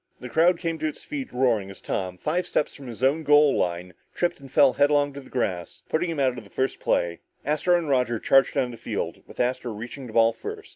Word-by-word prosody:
The 125 Hz, -, -8 dB
crowd 170 Hz, +6 st, +4 dB
came 165 Hz, -2 st, -3 dB
to 155 Hz, -, 0 dB
its 155 Hz, -, -6 dB
feet, 280 Hz, -4 st, -5 dB
roaring, 120 Hz, -6 st, +1 dB
as 95 Hz, -, -10 dB
Tom, 90 Hz, -1 st, -3 dB
five 175 Hz, -, -1 dB
steps 150 Hz, -, 0 dB
from 140 Hz, -2 st, -11 dB
his 120 Hz, +1 st, -7 dB
own 140 Hz, +5 st, +3 dB
goal 150 Hz, -1 st, +5 dB
line, 90 Hz, +1 st, -2 dB, 0.2 s
tripped 175 Hz, -3 st, 0 dB
and 135 Hz, -2 st, -13 dB
fell 140 Hz, -3 st, +5 dB
headlong 145 Hz, 0 st, +3 dB
to 140 Hz, -, -8 dB
the 130 Hz, -, -16 dB
grass, 90 Hz, -9 st, -3 dB
putting 170 Hz, +2 st, 0 dB
him 160 Hz, -3 st, -3 dB
out 130 Hz, -2 st, +1 dB
of -, -, -13 dB
the 100 Hz, -, -17 dB
first 130 Hz, +5 st, -2 dB
play. 85 Hz, -1 st, 0 dB, 0.3 s
Astro 155 Hz, +5 st, +2 dB
and 170 Hz, -2 st, -3 dB
Roger 125 Hz, -4 st, +1 dB
charged 135 Hz, +4 st, +3 dB
down 130 Hz, -3 st, +1 dB
the 115 Hz, -, -9 dB
field, -, -, -4 dB
with -, -, -14 dB
Astro 125 Hz, -1 st, 0 dB
reaching 120 Hz, +5 st, -7 dB
the 110 Hz, -, -10 dB
ball 115 Hz, 0 st, +4 dB
first. 115 Hz, -, -8 dB
135 Hz, 240 wpm, -25 LUFS, 115-150 Hz, 0.3 s, goal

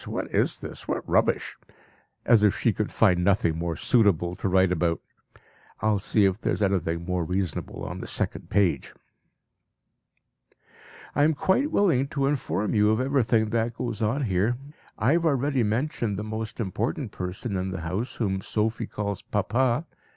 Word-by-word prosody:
What -, -, -4 dB
is -, -, +2 dB
this? -, -, -9 dB
What -, -, -3 dB
rubbish! -, -, +1 dB, 0.7 s
As 115 Hz, -3 st, +5 dB
if 105 Hz, -2 st, +3 dB
she 115 Hz, -, +2 dB
could 105 Hz, +1 st, -2 dB
find 90 Hz, -5 st, +3 dB
nothing 90 Hz, -4 st, +2 dB
more 85 Hz, -1 st, -2 dB
suitable 90 Hz, -6 st, +2 dB
to -, -, -1 dB
write 95 Hz, 0 st, +4 dB
about! 85 Hz, -1 st, +1 dB, 0.8 s
I 110 Hz, +1 st, +2 dB
will 105 Hz, -, +1 dB
see 105 Hz, +1 st, +3 dB
if 95 Hz, +3 st, 0 dB
there -, -, 0 dB
is -, -, -1 dB
anything 85 Hz, -4 st, 0 dB
more 90 Hz, -1 st, -1 dB
reasonable 90 Hz, -1 st, -3 dB
on -, -, -5 dB
the -, -, -6 dB
second -, -, -2 dB
page.) 100 Hz, -4 st, +1 dB, 2.2 s
"I 145 Hz, -, +3 dB
am 155 Hz, +1 st, +3 dB
quite 220 Hz, -, +2 dB
willing 160 Hz, -, +2 dB
to 140 Hz, -1 st, -1 dB
inform 105 Hz, -, -1 dB
you 105 Hz, -1 st, +4 dB
of 110 Hz, +1 st, +2 dB
everything 125 Hz, -5 st, +2 dB
that 115 Hz, 0 st, 0 dB
goes 120 Hz, -3 st, -4 dB
on 115 Hz, +7 st, +1 dB
here. 105 Hz, +3 st, +1 dB, 0.4 s
I 120 Hz, +5 st, +2 dB
have 170 Hz, +1 st, +2 dB
already 140 Hz, -2 st, +1 dB
mentioned 115 Hz, -1 st, -1 dB
the 105 Hz, -, -3 dB
most 110 Hz, +1 st, -5 dB
important 115 Hz, +4 st, -2 dB
person 95 Hz, +4 st, -4 dB
in 95 Hz, 0 st, -2 dB
the 95 Hz, -1 st, -5 dB
house, 95 Hz, +9 st, -3 dB
whom 95 Hz, -4 st, -1 dB
Sophie 110 Hz, +3 st, -1 dB
calls 100 Hz, -2 st, -4 dB
'Papa.' 120 Hz, -, 0 dB
105 Hz, 170 wpm, -26 LUFS, 95-120 Hz, 2.2 s, As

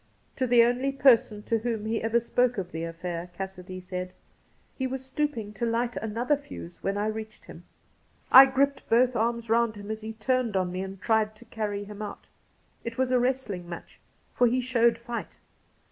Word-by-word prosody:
To 255 Hz, -, +1 dB
the 240 Hz, -1 st, +6 dB
only 245 Hz, +3 st, +1 dB
person 235 Hz, -6 st, +4 dB
to 225 Hz, +1 st, 0 dB
whom 225 Hz, -2 st, -2 dB
he 225 Hz, +1 st, -1 dB
ever 225 Hz, +1 st, +2 dB
spoke 245 Hz, +1 st, +1 dB
of 180 Hz, -2 st, -4 dB
the 165 Hz, +1 st, -4 dB
affair, 170 Hz, +1 st, -5 dB
Cassidy 185 Hz, -1 st, -6 dB
said: 180 Hz, 0 st, -5 dB, 0.3 s
' -, -, -38 dB
He 260 Hz, -, 0 dB
was 265 Hz, 0 st, -5 dB
stooping 265 Hz, -6 st, -2 dB
to 225 Hz, +3 st, -2 dB
light 235 Hz, +1 st, 0 dB
another 230 Hz, +6 st, 0 dB
fuse 285 Hz, -11 st, -10 dB
when 195 Hz, +1 st, -1 dB
I 205 Hz, -, 0 dB
reached 215 Hz, 0 st, -5 dB
him. -, -, -12 dB, 0.7 s
I 265 Hz, +1 st, +11 dB
gripped 275 Hz, +1 st, 0 dB
both 245 Hz, +2 st, +4 dB
arms 235 Hz, 0 st, 0 dB
round 230 Hz, 0 st, +2 dB
him 205 Hz, +1 st, -7 dB
as 220 Hz, 0 st, -5 dB
he 220 Hz, +1 st, -6 dB
turned 230 Hz, -1 st, 0 dB
on 185 Hz, -1 st, 0 dB
me 185 Hz, +1 st, -3 dB
and 190 Hz, 0 st, -6 dB
tried 220 Hz, 0 st, +1 dB
to 235 Hz, +3 st, -16 dB
carry 210 Hz, -3 st, -3 dB
him 205 Hz, +1 st, -9 dB
out. 210 Hz, -, -7 dB, 0.6 s
It 230 Hz, 0 st, -5 dB
was 260 Hz, 0 st, +1 dB
a 250 Hz, -, +4 dB
wrestling 240 Hz, -9 st, -1 dB
match, 170 Hz, -, -9 dB, 0.3 s
for 245 Hz, -, +4 dB
he 250 Hz, +2 st, +1 dB
showed 235 Hz, -2 st, +3 dB
fight. 235 Hz, 0 st, -6 dB
225 Hz, 195 wpm, -27 LUFS, 205-245 Hz, 0.7 s, I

